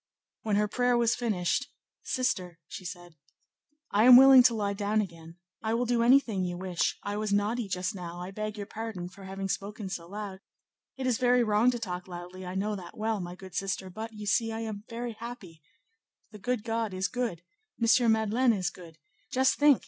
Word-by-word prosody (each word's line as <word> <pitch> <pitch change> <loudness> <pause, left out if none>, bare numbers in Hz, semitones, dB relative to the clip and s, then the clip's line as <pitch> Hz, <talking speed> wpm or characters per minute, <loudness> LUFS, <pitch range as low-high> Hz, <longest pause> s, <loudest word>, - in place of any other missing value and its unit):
When 215 -2 0
her 210 +1 +2
prayer 245 +2 +2
was 235 -1 +3
finished, 225 +3 -1 0.3
"Sister," 185 -9 -1
she - - -8
said, 175 -2 -9 0.7
"I 210 +3 +4
am 250 0 +11
willing 265 0 +10
to 240 -1 +4
lie 205 -2 -1
down 205 +1 0
again; 170 -4 -6 0.2
I 220 +1 0
will 245 +1 +1
do 240 -1 +1
anything 235 -5 +4
you 175 -1 -3
wish; 180 -2 -1
I 205 0 -3
was 215 -1 -2
naughty 210 +3 +1
just 185 -1 -2
now; 175 -2 -7
I 180 +2 -6
beg 215 +1 -4
your 205 - -4
pardon 215 -5 -6
for 195 +1 -13
having 195 0 -4
spoken 200 +1 -4
so 170 -2 -5
loud; 200 0 -6 0.6
it 265 - -3
is 250 -3 +1
very 250 -1 +4
wrong 215 +2 +3
to 250 - 0
talk 180 -5 -5
loudly; 180 +1 -8
I 180 - -5
know 205 +2 -1
that 180 -3 -10
well, 220 0 -1
my 175 -1 -6
good 185 -1 -12
sister, 190 0 -3
but, 220 +4 -6
you 210 -1 -8
see, 225 +2 +2
I 225 0 -4
am 215 -2 -5
very 235 0 -4
happy: 215 -8 -9 0.7
the 210 - -11
good 240 +2 -1
God 225 -3 -2
is 190 +1 0
good; 235 -9 -3 0.4
M. 230 0 +4
Madeleine 220 +3 +3
is 185 -4 -1
good; 165 -3 -13 0.3
just 260 0 +2
think! 290 -3 +6
210 Hz, 200 wpm, -29 LUFS, 185-230 Hz, 0.7 s, am